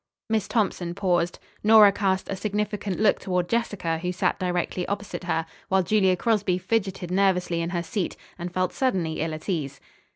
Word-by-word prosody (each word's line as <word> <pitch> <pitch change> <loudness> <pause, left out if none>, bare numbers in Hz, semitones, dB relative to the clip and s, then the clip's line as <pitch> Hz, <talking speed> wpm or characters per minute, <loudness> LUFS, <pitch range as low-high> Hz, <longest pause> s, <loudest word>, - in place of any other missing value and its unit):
Miss 220 -3 +1
Thompson 185 -6 -1
paused. 175 -3 +1 0.3
Nora 215 -1 +8
cast 190 -2 0
a 195 - -3
significant 205 0 -2
look 215 -1 +3
toward 180 -2 -1
Jessica, 205 -7 -1
who 180 +2 -2
sat 180 - 0
directly 180 0 -1
opposite 200 -2 -4
her, 165 -2 0 0.2
while 190 0 +3
Julia 190 0 +3
Crosby 205 -2 +1
fidgeted 190 -2 -2
nervously 180 -3 +2
in 165 - -2
her 175 -1 -2
seat, 190 +2 -3 0.2
and 175 +1 -4
felt 185 0 -1
suddenly 185 -12 0
ill 160 0 -2
at 155 - -11
ease. 150 -8 -2
185 Hz, 170 wpm, -25 LUFS, 175-205 Hz, 0.3 s, Nora